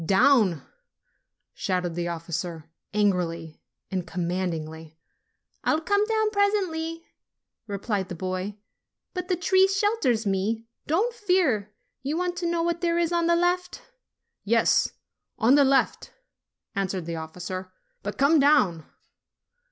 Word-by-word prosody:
"Down 190 - +4 0.5
!" - - -47 0.3
shouted 180 -3 -1
the 175 +1 -2
officer, 165 -1 -5 0.2
angrily 175 -6 0 0.3
and 185 -2 -2
command 180 +2 -1
ingly. 160 0 -7 0.7
"I'll 310 - +2
come 405 +5 +2
down 435 -1 +1
presently," 360 -6 0 0.6
replied 200 -1 -2
the 180 - -5
boy. 185 +3 -4 0.6
"But 360 -1 -4
the 365 - +1
tree 375 +2 +4
shelters 390 - +1
me. 205 +4 0 0.2
Don't 405 +11 +1
fear. 345 - +1 0.3
You 285 +5 -2
want 355 0 -1
to 350 -1 -1
know 335 -1 0
what 340 0 -1
there 340 -1 +1
is 340 -1 +1
on 340 -1 +2
the 340 - +4
left?" 355 +1 0 0.6
"Yes, - - +3 0.5
on 235 +4 +4
the 285 0 +7
left," 270 0 +2 0.6
answered 190 -3 -2
the 165 0 -4
officer; 180 +3 -6 0.3
"but - - -5
come 295 +3 +5
down." 210 - +4
225 Hz, 130 wpm, -26 LUFS, -, 0.7 s, the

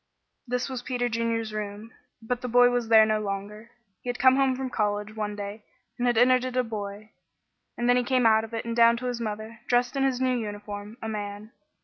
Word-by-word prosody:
This 250 +1 -1
was 260 -2 -5
Peter 245 -1 -1
Junior's 230 -1 -1
room, 210 +1 -6 0.3
but 245 +2 -2
the 250 - -4
boy 245 +1 +5
was 245 -2 -1
there 220 -1 +8
no 215 0 +1
longer. 210 +2 -5 0.3
He 245 - -6
had 245 - -2
come 260 +1 +5
home 270 -1 +2
from 260 0 -4
college 210 0 -1
one 210 -1 -3
day 205 +1 -6 0.4
and 245 - +1
had 240 -2 +2
entered 255 +1 +5
it 255 0 -3
a 255 - +3
boy, 210 -1 -6 0.7
and 240 - -1
then 245 0 +5
he 250 - +2
came 250 0 +1
out 220 0 +5
of 225 - -8
it 230 0 -4
and 230 0 -3
down 235 0 +5
to 250 - -6
his 245 -1 -3
mother, 215 +1 -5
dressed 245 +2 +1
in 275 - 0
his 265 -2 +1
new 255 -1 +1
uniform 205 -1 -6
a - - -3
man. 205 0 -5
230 Hz, 230 wpm, -26 LUFS, 215-245 Hz, 0.7 s, there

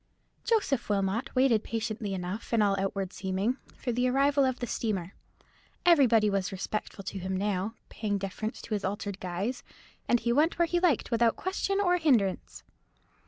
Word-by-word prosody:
Joseph 405 - +1
Wilmot 205 +6 -1
waited 255 -4 +4
patiently 215 -3 -3
enough, 185 +4 -5
in 225 -2 +4
all 200 -1 +3
outward 195 -1 -2
seeming, 195 +6 -1 0.2
for 250 - -2
the 245 +2 +1
arrival 280 +2 +3
of 260 -1 0
the 245 - -2
steamer. 200 -6 -2 0.7
Everybody 250 -11 +5
was 195 -2 0
respectful 195 +1 -4
to 190 +1 -5
him 190 +1 -2
now, 200 +2 -1
paying 205 -2 -2
deference 200 +4 -5
to 225 - -5
his 205 - -1
altered 200 0 -3
guise, 190 +8 -3 0.5
and 240 - +4
he 235 +1 0
went 305 +6 +3
where 340 - +4
he 345 +1 0
liked 345 -9 +2
without 230 -1 +3
question 390 +1 -1
or 360 -3 +3
hindrance. 240 - +1
220 Hz, 165 wpm, -29 LUFS, 195-260 Hz, 0.7 s, Everybody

